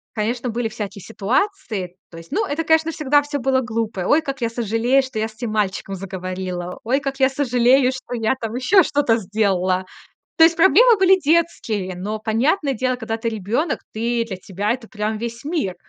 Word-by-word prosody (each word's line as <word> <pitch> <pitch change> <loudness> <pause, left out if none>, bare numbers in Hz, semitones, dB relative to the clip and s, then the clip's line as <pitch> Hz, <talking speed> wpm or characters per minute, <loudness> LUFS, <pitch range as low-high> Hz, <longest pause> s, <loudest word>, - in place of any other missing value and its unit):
конечно, 235 +3 -2
были 235 0 -1
всякие 210 -3 -6
ситуации. 225 - -2 0.2
То 165 - -11
есть, 165 0 -12
ну 230 - 0
это, 300 +3 -2
конечно, 320 +1 +2
всегда 290 -2 +2
всё 290 0 -4
было 260 +1 +1
глупо. 225 -4 -3
"Ой, 300 +3 +4
как 275 -4 -5
я 230 - +1
сожалею, 230 +3 +1
что 260 -4 -5
я 215 - +1
с 215 - -18
этим 235 -1 -4
мальчиком 195 -2 -2
заговорила. 185 -1 -5
Ой, 260 +5 +1
как 275 -1 -4
я 265 - +5
сожалею, 255 -1 +3
что 260 -1 -8
я 225 +2 0
там 225 - -3
ещё 355 +10 +4
что-то 285 -7 +2
сделала". 190 -3 0 0.5
То 325 - +7
есть, 330 0 +4
проблемы 450 +7 +6
были 380 0 +6
детские. 235 - 0
Но, 210 +4 -4
понятное 265 - +1
дело, 255 +2 -1
когда 235 -2 -4
ты 230 0 -3
ребёнок, 265 - 0 0.2
ты 235 +1 0
для 190 -5 -5
тебя 205 +3 -2
это 240 -2 -6
прям 215 0 -3
весь 235 +1 -6
мир. 295 - -2
235 Hz, 195 wpm, -21 LUFS, 210-275 Hz, 0.5 s, То